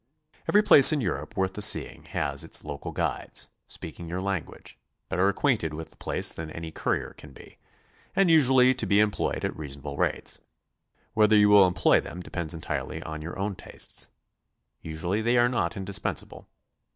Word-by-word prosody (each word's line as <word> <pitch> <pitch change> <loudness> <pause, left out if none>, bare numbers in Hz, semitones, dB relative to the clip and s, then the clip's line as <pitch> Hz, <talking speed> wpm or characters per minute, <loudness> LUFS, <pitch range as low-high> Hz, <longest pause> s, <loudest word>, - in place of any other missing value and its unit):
Every 210 +1 +5
place 145 -8 +9
in 155 - +1
Europe 125 - -4
worth 95 0 0
the 105 - -6
seeing 105 - +1
has - - -2
its - - -5
local 75 -2 -6
guides, - - -3 0.2
speaking 80 +2 -9
your 90 +2 -3
language, 95 -4 -5 0.3
better 90 +4 +2
acquainted 100 - 0
with 80 +1 -8
the - - -21
place - - -1
than 80 -1 -7
any 80 +1 -7
courier - - -2
can - - -14
be, - - -15 0.6
and 195 - +4
usually 130 -5 +5
to 120 -5 -3
be 100 +2 +3
employed 105 -1 0
at - - -3
reasonable 70 -1 -7
rates. - - -1 0.7
Whether 110 -1 +4
you 105 0 +5
will 100 -2 +7
employ 90 -2 +3
them 90 - -9
de 90 - -10
pends 85 -1 -2
entirely 80 - -5
on 80 0 -7
your 85 +3 -7
own 100 +1 -2
tastes. - - -4 0.7
Usually 85 +6 -3
they 120 +2 +2
are 120 0 +5
not 95 -9 -2
in 95 - -5
dispensable. 100 +1 -1
95 Hz, 175 wpm, -26 LUFS, 80-110 Hz, 0.7 s, place